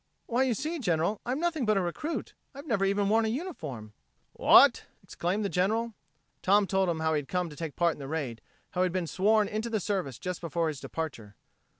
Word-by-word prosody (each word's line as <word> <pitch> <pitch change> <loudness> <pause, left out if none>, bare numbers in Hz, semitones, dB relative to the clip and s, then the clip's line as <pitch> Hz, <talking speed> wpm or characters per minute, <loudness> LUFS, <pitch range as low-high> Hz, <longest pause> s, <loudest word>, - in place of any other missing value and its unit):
"Why, 240 +2 0
you 260 -3 +2
see, 315 +8 -3
General, 175 - 0
I'm 255 +4 -1
nothing 330 -4 0
but 215 -2 +2
a - - +4
recruit, 185 - -3 0.2
I've 280 +2 -9
never 215 -9 +1
even 200 +1 +1
worn 220 +2 +3
a - - 0
uniform." 160 - -5 0.4
"What?" - - +6 0.2
exclaimed 195 +5 -2
the - - +2
General. 220 +5 0 0.5
Tom 200 +2 +4
told 190 -1 +1
him 160 -2 -1
how 160 0 +1
he 150 - +2
had 140 - -8
come 180 -3 -1
to - - -10
take 160 -2 -5
part 170 -1 +2
in - - -14
the 135 - -6
raid, 135 -7 -3 0.3
how 180 - -1
he - - +4
had 180 - -2
been 185 -2 0
sworn 210 +5 +2
into 215 +3 -3
the 220 -2 0
service 180 - -2
just 180 -1 -5
before 170 -1 -1
his 150 -3 -5
departure. 125 -11 -6
190 Hz, 225 wpm, -29 LUFS, 160-220 Hz, 0.5 s, What